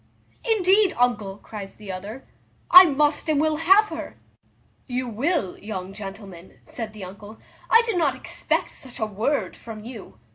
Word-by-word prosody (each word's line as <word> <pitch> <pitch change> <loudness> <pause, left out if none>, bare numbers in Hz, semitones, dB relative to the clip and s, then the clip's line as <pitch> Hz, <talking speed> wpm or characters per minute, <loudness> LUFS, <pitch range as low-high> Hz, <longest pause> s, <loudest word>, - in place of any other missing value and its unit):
"Indeed, 410 -3 +3
uncle," 220 -5 0
cries 205 -2 -9
the 210 -3 -8
other, 205 +8 -8 0.5
"I 365 +1 +12
must 295 +1 +1
and 300 -2 +2
will 310 0 +1
have 385 +6 +5
her." - - -7 0.7
"You 255 -1 -3
will, 240 - -1
young 195 -2 -6
gentleman;" 195 -3 -10
said 225 -2 -7
the 210 -2 -9
uncle; 205 +4 -10 0.3
"I 460 +1 +6
did 445 -6 0
not 285 -5 +1
expect 260 - -3
such 260 -2 -9
a 220 - 0
word 220 +8 -2
from 220 -2 -10
you. 215 - -10
235 Hz, 155 wpm, -24 LUFS, 205-310 Hz, 0.7 s, I